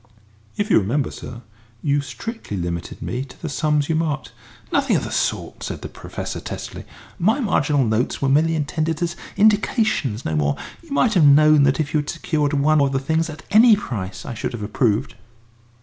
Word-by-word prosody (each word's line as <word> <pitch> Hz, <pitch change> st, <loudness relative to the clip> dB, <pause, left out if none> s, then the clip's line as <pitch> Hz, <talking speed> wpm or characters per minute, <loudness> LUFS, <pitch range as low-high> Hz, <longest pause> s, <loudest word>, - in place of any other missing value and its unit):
"If 205 Hz, +1 st, -1 dB
you -, -, +6 dB
remember, 120 Hz, +8 st, -1 dB
sir, 120 Hz, 0 st, -9 dB, 0.4 s
you 145 Hz, -1 st, +2 dB
strictly 135 Hz, -, -6 dB
limited 85 Hz, -1 st, -4 dB
me 125 Hz, +2 st, -3 dB
to 130 Hz, -2 st, -14 dB
the 160 Hz, -, -5 dB
sums 150 Hz, 0 st, +1 dB
you 160 Hz, -, 0 dB
marked." 150 Hz, -6 st, -1 dB, 0.4 s
"Nothing -, -, +2 dB
of -, -, 0 dB
the -, -, -5 dB
sort," -, -, -2 dB
said -, -, -5 dB
the -, -, -5 dB
Professor, -, -, -6 dB
testily; -, -, -7 dB, 0.3 s
"my 220 Hz, +10 st, +2 dB
marginal 150 Hz, -, +2 dB
notes 110 Hz, +3 st, 0 dB
were 140 Hz, -, 0 dB
merely 155 Hz, +4 st, +3 dB
intended 155 Hz, +2 st, -1 dB
as 170 Hz, 0 st, -2 dB, 0.2 s
indications, 210 Hz, -, +2 dB
no 80 Hz, -, -1 dB
more. 75 Hz, -1 st, +1 dB, 0.3 s
You 335 Hz, -, -19 dB
might 250 Hz, -5 st, +2 dB
have 175 Hz, -6 st, +5 dB
known 150 Hz, +1 st, +6 dB
that 135 Hz, +1 st, +2 dB
if 150 Hz, -2 st, -2 dB
you 155 Hz, -, +3 dB
had 145 Hz, -, -4 dB
secured 150 Hz, -3 st, -1 dB
one 145 Hz, +1 st, +3 dB
of 140 Hz, -1 st, +1 dB
the 135 Hz, -, +1 dB
things 160 Hz, +4 st, 0 dB
at 155 Hz, +1 st, -9 dB
any 220 Hz, +2 st, +7 dB
price 100 Hz, -, -5 dB
I -, -, -5 dB
should 115 Hz, -, -4 dB
have 115 Hz, -3 st, -5 dB
approved." 110 Hz, +3 st, 0 dB
145 Hz, 195 wpm, -21 LUFS, 125-165 Hz, 0.4 s, any